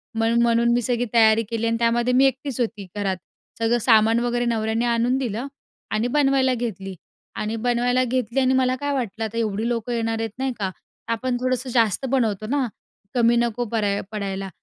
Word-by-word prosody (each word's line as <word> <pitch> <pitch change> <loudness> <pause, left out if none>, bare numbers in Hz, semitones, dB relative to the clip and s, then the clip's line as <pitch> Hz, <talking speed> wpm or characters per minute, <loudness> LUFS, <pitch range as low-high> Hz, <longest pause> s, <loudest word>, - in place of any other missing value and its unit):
म्हणून 225 +1 +2
म्हणून 235 0 +3
मी 240 - +2
सगळी 245 0 0
तयारी 225 -1 +5
केली 230 -1 -1
आणि 230 0 +1
त्यामध्ये 235 +1 +2
मी 260 +2 +5
एकटीच 265 -1 -1
होती 220 -4 -2
घरात. 195 -2 -1 0.4
सगळं 230 +1 +2
सामान 225 0 +4
वगैरे 240 0 0
नवऱ्याने 225 0 0
आणून 240 +2 +1
दिलं 245 -1 -3 0.4
आणि 220 +3 0
बनवायला 270 -1 +2
घेतली 200 -6 -4 0.4
आणि 215 +1 -3
बनवायला 245 +2 +1
घेतली 250 0 -1
आणि 260 0 +3
मला 255 -1 +2
काय 285 +2 -2
वाटलं, 225 -5 -3
आता 220 +1 -6
एवढी 220 0 -1
लोकं 240 0 -2
येणार 225 -1 -1
आहेत, 225 0 -2
नाही 265 0 0
का? 195 -2 -1 0.4
आपण 245 +2 -1
थोडंसं 255 0 -1
जास्त 230 -1 +1
बनवतो 220 -6 0
ना, 270 +1 0 0.5
कमी 235 -1 +4
नको 235 0 0
पऱ्या 205 -3 0
पडायला 195 -2 -4
235 Hz, 180 wpm, -23 LUFS, 220-250 Hz, 0.5 s, तयारी